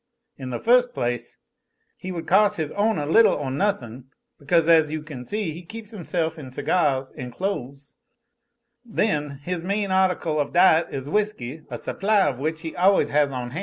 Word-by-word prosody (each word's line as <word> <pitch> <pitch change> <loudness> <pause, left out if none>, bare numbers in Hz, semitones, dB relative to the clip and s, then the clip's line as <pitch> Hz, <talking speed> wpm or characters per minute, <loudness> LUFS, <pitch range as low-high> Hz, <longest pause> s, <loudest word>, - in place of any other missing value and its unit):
In 130 -2 -7
the 120 - -3
first 245 +1 +3
place, 120 -1 -3 0.6
he 185 - -7
would 170 -2 -5
cos' 205 +2 +4
his 155 -2 -3
ownah 205 -8 0
little 225 +9 +5
or 140 -3 -3
nothin', 130 - -2 0.3
because, 160 +3 +2
as 160 -3 +5
you 155 -1 -4 0.2
see, 205 - -3
he 170 +3 -9
keeps 220 +4 -10
himself 170 -5 -3
in 140 - -8
cigahs 135 -1 0
an' 125 - -6
clo'es; 140 -4 -5 0.9
then, 150 - -1
his 180 0 -3
main 200 +1 -1
article 185 -5 +1
of 145 - -2
diet 175 -2 +5
is 135 0 -6
whisky 160 - -2
a - - -5
supply 205 +1 +1
of 130 -3 -2
which 155 +3 -2
he 165 -1 -6
always 190 +2 +3
has 145 -1 +2
on 125 -2 -5
ban'. 150 +8 -5
160 Hz, 175 wpm, -24 LUFS, 140-195 Hz, 0.9 s, little